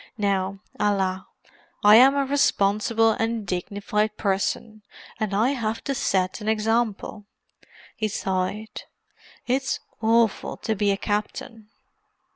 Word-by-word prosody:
"Now, 195 -2 0 0.2
alas, 190 -2 0 0.6
I 210 +1 +8
am 265 +3 +7
a 280 -1 +1
responsible 225 -4 +2
and 225 -1 -2
dignified 205 +3 -2
person, 210 +2 -2 0.4
and 215 -3 -1
I 215 +5 +2
have 230 -5 -2
to 275 - -2
set 190 -6 0
an 210 - -2
example." 220 -1 -1 0.7
He 215 - -1
sighed. 195 +2 -3 0.6
"It's 265 +2 0 0.2
awful 225 -1 +2
to 220 - -2
be 205 -1 0
a 195 - +1
captain!" 210 +2 -4
215 Hz, 115 wpm, -24 LUFS, 200-225 Hz, 0.7 s, I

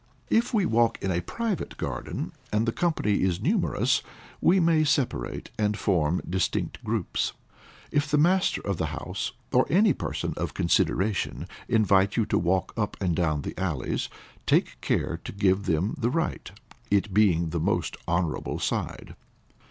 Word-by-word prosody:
If 230 +2 +3
we 210 -5 +2
walk 115 -4 +3
in 95 - -1
a 85 0 0
private 225 - -3
garden, - - -4 0.2
and 105 +2 +2
the - - +3
company 155 - +1
is 90 -2 +1
numerous, - - +1 0.4
we 190 +3 +5
may 165 -2 +4
separate, 140 - -1
and 105 -1 +1
form 90 -5 +1
distinct 95 +1 -1
groups. - - -1 0.6
If 145 0 +1
the 150 - +3
master 180 +5 +3
of 100 -3 -2
the 80 - -1
house - - -4 0.2
or - - +4
any 200 +6 +5
person - - -3
of - - -3
consideration, 100 +2 +1 0.2
invite 100 -2 +3
you 115 - +3
to - - +1
walk 90 +2 0
up 105 -2 -2
and 90 -4 0
down 75 -4 0
the - - -4
alleys, 80 -9 -2 0.4
take - - +2
care 85 +1 -1
to - - -6
give 100 -1 +1
them 85 - +1
the 120 -1 +1
right, 165 +6 -2 0.4
it 100 0 +1
being 90 -5 +3
the 85 - -1
most 80 - 0
honorable 85 -2 -1
side. - - -3
100 Hz, 160 wpm, -27 LUFS, 90-145 Hz, 0.6 s, we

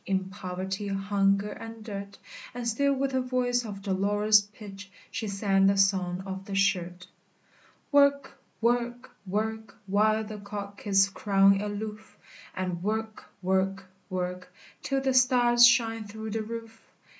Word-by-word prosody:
In 190 0 -2
poverty, 190 0 -5
hunger, 195 +1 +1
and 225 +1 -9
dirt; 200 -2 -7 0.4
And 245 -1 -4
still 280 +5 +2
with 270 0 -1
a 260 - +1
voice 250 -1 0
of 200 -3 -8
dolorous 205 +2 +3
pitch 205 -1 -11 0.2
She 225 0 -4
sang 195 -1 +2
the 195 0 +3
"Song 190 -2 +1
of 190 0 -6
the 195 - -5
Shirt!" 180 -2 0 0.9
"Work! 280 -1 +3 0.3
work! 240 +1 0 0.2
work 220 +1 -3
While 215 +2 +2
the 215 -1 -8
cock 200 0 -8
is 195 -1 +5
crowing 195 0 +3
aloof! 210 +1 -6 0.4
And 180 -2 -3
work 220 +2 -3 0.2
work 190 +1 0 0.3
work 180 -1 -4 0.3
Till 275 -1 -1
the 265 -1 +1
stars 245 -2 +6
shine 225 -2 +2
through 220 +1 -7
the 220 +1 -2
roof! 225 0 -8
205 Hz, 140 wpm, -28 LUFS, 195-225 Hz, 0.9 s, stars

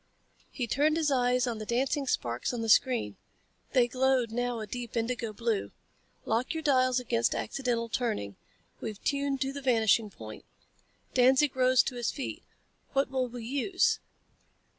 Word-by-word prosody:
He 250 - -3
turned 300 +6 +2
his 310 -3 +1
eyes 250 -1 +2
on 235 -3 -3
the - - -4
dancing 265 +3 0
sparks 120 - -1
on 235 - -3
the 225 - -2
screen. 215 - +3 0.6
They 250 -3 +4
glowed 255 -1 +1
now 245 0 -1
a 215 - -4
deep 240 +2 -6
indigo 230 0 -2
blue. 220 -1 -1 0.6
"Lock 235 +8 0
your 320 - -3
dials 255 -3 +3
against 235 -1 0
accidental 235 -2 -2
turning. 215 - -2 0.4
We're 215 - -5
tuned 280 +4 -1
to 270 0 -1
the 280 - -6
vanishing 225 -4 +3
point." 110 - -10 0.7
Danzig 260 +2 +4
rose 255 0 +4
to 250 - -4
his 240 - -1
feet. 275 - -5 0.5
"What 275 -1 +1
will 260 -1 0
we 240 -1 -8
use?" 365 - +1
250 Hz, 160 wpm, -29 LUFS, 230-265 Hz, 0.7 s, They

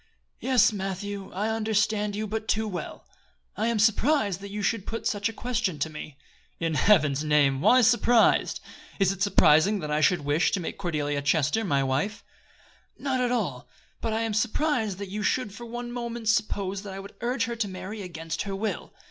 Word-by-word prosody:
"Yes, 255 -4 +3
Matthew, 195 0 -4
I 210 +4 -2
understood 215 -1 0
you 215 +1 -2
but 220 +1 -4
too 220 +1 +1
well. 185 -4 -6 0.5
I 220 - 0
am 235 -1 +1
surprised 220 - +2
that 200 - -7
you 205 +1 -4
should 215 -1 -1
put 230 - -4
such 205 +1 0
a - - -8
question 230 -7 -2
to 155 +2 -2
me." 150 -2 -9 0.4
"In 165 -1 -1
Heaven's 150 -5 +3
name! 145 -3 +3
why 255 +9 +6
surprised? 235 0 +3 0.4
Is 195 -1 +3
it 195 -1 -7
surprising 190 0 +5
that 150 -1 -4
I 150 +1 +1
should 175 0 +3
wish 150 +3 +2
to 195 - +1
make 170 - -5
Cordelia 150 -6 -1
Chester 150 +7 +1
my 140 -9 +1
wife?" 140 +11 -1 0.7
"Not 265 -2 -1
at 245 -1 +1
all; 180 - -2 0.3
but 225 - -1
I 220 +1 0
am 225 -1 -1
surprised 220 - 0
that 200 -1 -6
you 210 +1 -3
should 210 +1 0
for 235 +2 -9
one 240 +1 -6
moment 235 -2 -3
suppose 200 -3 0
that 200 -2 -8
I 195 - -6
would 195 +1 -10
urge 240 0 0
her 235 0 -4
to 220 -2 -1
marry 195 +3 -7
against 165 -3 -5
her 195 -1 -3
will. 215 +2 -4
205 Hz, 195 wpm, -26 LUFS, 175-225 Hz, 0.7 s, why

